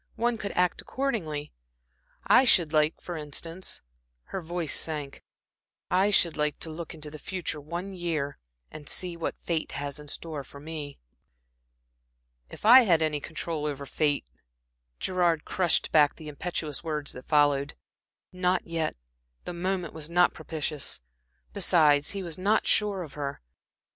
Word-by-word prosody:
One 235 -1 0
could 200 - -4
act 180 0 +2
accordingly. 175 - -2 0.7
I 260 - +7
should 170 -10 +4
like, 155 0 +3
for 175 - -6
instance" 165 +4 -2 0.5
her 190 - -2
voice 170 -2 -2
sank 150 -3 -1 0.7
"I 190 +3 +4
should 175 -5 +4
like 150 -1 0
to 160 - -3
look 165 +1 -7
into 150 -1 -7
the 155 - -9
future 170 -3 -4
one 175 +6 -5
year, 165 -6 -2 0.3
and 150 -1 -8
see 180 -2 0
what 170 - -3
fate 165 -2 -2
has 145 0 -4
in 150 - -11
store 150 -1 -3
for 140 - -12
me." 150 -1 -7 1.5
"If - - -9
I 245 +4 +11
had 170 -9 +4
any 155 -1 +1
control 155 0 -3
over 140 -1 -4
fate" 145 - +1 0.7
Gerard 175 -4 +1
crushed 180 -3 +2
back 150 -2 +5
the 155 -1 -9
impetuous 150 0 -4
words 150 -3 -2
that 125 - -10
followed. 145 -2 +3 0.6
Not 180 0 +1
yet 165 -2 -1 0.5
the 180 - -4
moment 180 -1 -2
was 160 -1 -6
not 175 +1 +4
propitious. 155 -2 -3 0.5
Besides, 150 -3 +4
he 195 -1 -2
was 170 -1 -6
not 205 +4 +2
sure 205 -3 +2
of 150 - -10
her. 140 -1 -4
160 Hz, 150 wpm, -28 LUFS, 150-180 Hz, 1.5 s, I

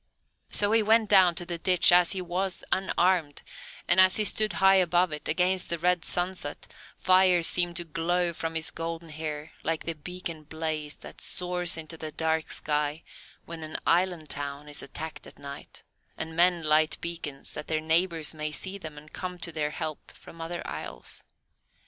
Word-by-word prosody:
So 205 0 +3
he 225 0 +5
went 220 0 +4
down 185 -4 +6
to 175 - -2
the 170 -1 -4
ditch 180 +1 +4
as 175 -1 +5
he 185 -1 -3
was, 180 +2 -1
unarmed, 180 -5 +1 0.4
and 175 - +5
as 185 0 +7
he 215 - +3
stood 215 0 +2
high 195 0 +5
above 180 -1 +3
it, 150 0 -5
against 180 +3 +1
the 170 - 0
red 180 0 +1
sunset, 180 -4 +1 0.3
fire 185 -2 +4
seemed 175 0 +1
to 175 - -2
flow 170 +2 0
from 165 0 -3
his 160 0 -1
golden 165 0 -5
hair 155 0 -5
like 160 +1 -1
the 165 - -2
beacon 165 0 -6
blaze 155 -1 -4
that - - -12
soars 180 -2 0
into 160 0 -7
the 155 -1 -6
dark 160 0 -1
sky 150 +1 -1 0.4
when 170 -1 -7
an 155 0 -3
island 175 -2 +1
town 145 +1 -1
is 145 -1 -3
attacked 160 +3 -7
at - - -12
night, 140 0 -9 0.3
and 160 0 -4
men 175 0 +4
light 155 0 +3
beacons 165 -5 -4
that 150 - -6
their 155 -1 0
neighbours 160 0 +1
may 155 -1 -3
see 190 +7 -4
them 155 -4 -8
and 150 +1 -13
come 180 -1 -5
to 170 0 -3
their 155 -2 -1
help 155 0 -6
from 165 - -13
other 170 +1 -5
isles. - - -6
165 Hz, 180 wpm, -27 LUFS, 155-180 Hz, 0.4 s, as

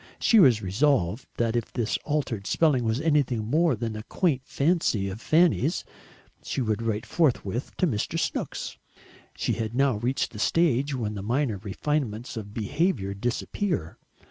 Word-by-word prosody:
She 225 - +5
was 120 - +5
resolved 115 - +1
that 115 0 0
if 120 - -2
this 120 -3 -1
altered 125 -10 -2
spelling 150 -7 +3
was 110 +2 0
anything 140 -8 +1
more 155 +4 +2
than 115 -1 -4
a 110 - -5
quaint 145 - 0
fancy 140 - +1
of 100 +4 -7
Fanny's, 160 0 +3 0.6
she - - -4
would 110 -3 0
write 115 0 -2
forthwith 120 - 0
to - - +2
Mr. 110 -11 -1
Snooks. - - -3 0.6
She - - -1
had 110 0 -3
now 135 -3 +3
reached 125 +3 -1
a 105 - -8
stage 140 -1 +2
when 110 -4 -2
the 100 - -5
minor 120 +1 0
refinements 115 +3 -2
of 105 -3 -6
behaviour 115 - -1
disappear. 120 - -2
120 Hz, 155 wpm, -26 LUFS, 110-150 Hz, 0.6 s, She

